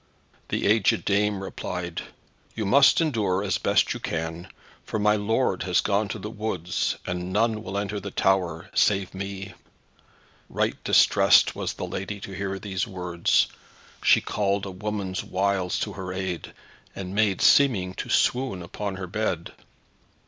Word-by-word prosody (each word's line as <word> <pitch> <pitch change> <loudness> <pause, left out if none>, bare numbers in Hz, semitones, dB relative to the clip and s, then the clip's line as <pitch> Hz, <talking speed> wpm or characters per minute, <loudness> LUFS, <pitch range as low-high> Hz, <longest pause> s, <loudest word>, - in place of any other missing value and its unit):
The - - -1
agèd 105 -5 +3
dame 100 -1 +1
replied, 90 -2 -5 0.5
"You 110 - -2
must 140 - +6
endure 105 - 0
as 100 - 0
best - - +2
you - - -6
may, 80 +2 -4 0.4
for - - -3
my 105 0 +3
lord 105 -1 0
has 90 -2 +2
gone 105 +1 +1
to 100 - -5
the 105 - -6
woods, 100 -6 -2
and 90 0 -3
none 110 +2 +1
will 100 -2 -5
enter 100 0 -2
in - - -5
the 100 - -5
tower, 95 -4 0
save 95 -2 +2
me." 95 0 -6 1.0
Right - - -1
distressed - - +5
was - - -3
the - - -5
lady 100 +2 -5
to 100 - -7
hear 95 0 -3
these 100 +2 -3
words. 90 -4 +1 0.6
She - - +5
called 100 -1 -1
a 95 - -5
woman's 95 -1 -3
wiles 95 -1 0
to - - -2
her 95 -1 -6
aid, 95 -3 -4 0.4
and 95 -1 -6
made 105 -2 +2
seeming 105 -10 +4
to - - -6
swoon 125 -8 +1
upon 100 +2 -5
her 95 0 -5
bed. 90 -2 -3
95 Hz, 155 wpm, -25 LUFS, 90-105 Hz, 1.0 s, must